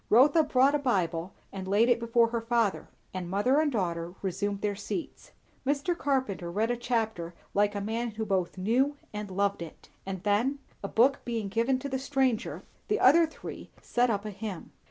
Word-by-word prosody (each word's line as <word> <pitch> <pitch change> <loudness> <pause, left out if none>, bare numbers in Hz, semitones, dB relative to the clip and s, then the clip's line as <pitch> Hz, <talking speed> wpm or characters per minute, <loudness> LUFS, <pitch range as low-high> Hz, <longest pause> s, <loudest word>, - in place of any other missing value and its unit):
Rotha 285 +9 +6
brought 275 -2 +3
a 295 - +2
Bible 185 -9 0 0.2
and 190 -1 -6
laid 205 +4 +4
it 245 -1 +3
before 235 0 +3
her 235 0 -2
father; 230 -3 0 0.2
and 180 -2 -4
mother 210 +9 +3
and 305 -2 +1
daughter 175 -5 -2
resumed 200 +2 -2
their 205 -1 0
seats. 325 - -6 0.3
Mr. 285 +5 0
Carpenter 260 - -1
read 215 +6 0
a - - +1
chapter, 220 -8 -2 0.2
like 205 +1 +2
a 205 - -2
man 230 +3 -2
who 220 0 -4
both 190 -3 -1
knew 255 +9 +1 0.2
and 210 -1 -5
loved 200 0 0
it; 165 -2 -10
and 190 -1 -5
then, 225 +7 +2 0.3
a - - -1
book 255 +7 +3
being 225 -4 -3
given 235 +6 +1
to 260 - -5
the 265 -1 -2
stranger, 265 -4 0 0.2
the 425 0 +1
other 325 +5 +6
three 310 - -9
set 245 0 +1
up 205 -2 -1
a 210 - -4
hymn. 200 -2 -6
225 Hz, 190 wpm, -29 LUFS, 195-260 Hz, 0.3 s, Rotha